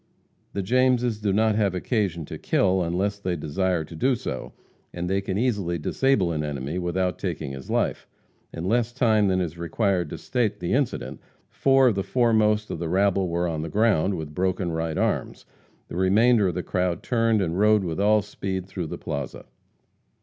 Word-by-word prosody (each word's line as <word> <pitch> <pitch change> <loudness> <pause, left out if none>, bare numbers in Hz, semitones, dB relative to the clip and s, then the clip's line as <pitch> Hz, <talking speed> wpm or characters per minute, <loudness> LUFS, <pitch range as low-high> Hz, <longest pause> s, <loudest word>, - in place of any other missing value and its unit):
The 100 - -2
Jameses 125 0 +2
do 105 -2 0
not 110 +2 +3
have 100 -3 +1
occasion 90 - -1
to - - -8
kill 95 -1 +2
unless 95 +4 -1
they 90 -3 -2
desire 85 +3 -1
to 80 - -11
do 130 +10 +2
so, 110 - -5 0.4
as 85 0 -3
they 95 +2 0
can 95 -1 -3
easily 100 -8 0
disable 100 - +1
an 75 -2 -2
enemy 75 +3 -3
without 90 +1 -1
taking 80 -6 -3
his 65 -1 -9
life. - - -1 0.4
In 85 - -6
less 120 +3 +1
time 110 -5 +3
than 95 -1 +2
is 85 -2 -3
required 90 0 0
to - - -6
state 120 -5 -1
the 90 -1 -2
incident, 135 -1 -1 0.3
four 135 -1 +4
of - - +1
the 100 - -1
foremost 110 -2 +2
of - - -4
the 85 -1 -3
rabble 95 0 +2
were 85 +1 0
on 80 -2 -2
the 80 - -4
ground, 100 -2 +2
with 80 -3 -6
broken 90 0 -1
right 80 -1 -2
arms. - - -1 0.4
The - - -7
remainder 105 +3 +4
of 90 - -2
the 90 - -2
crowd 90 -2 -1
turned 115 -2 +2
and 90 -1 -1
rode 105 -1 +4
with 85 -1 -3
all 105 +1 +4
speed 95 -2 -4
through 90 -3 -5
the - - -6
plaza. 70 -2 -5
95 Hz, 190 wpm, -25 LUFS, 85-110 Hz, 0.4 s, four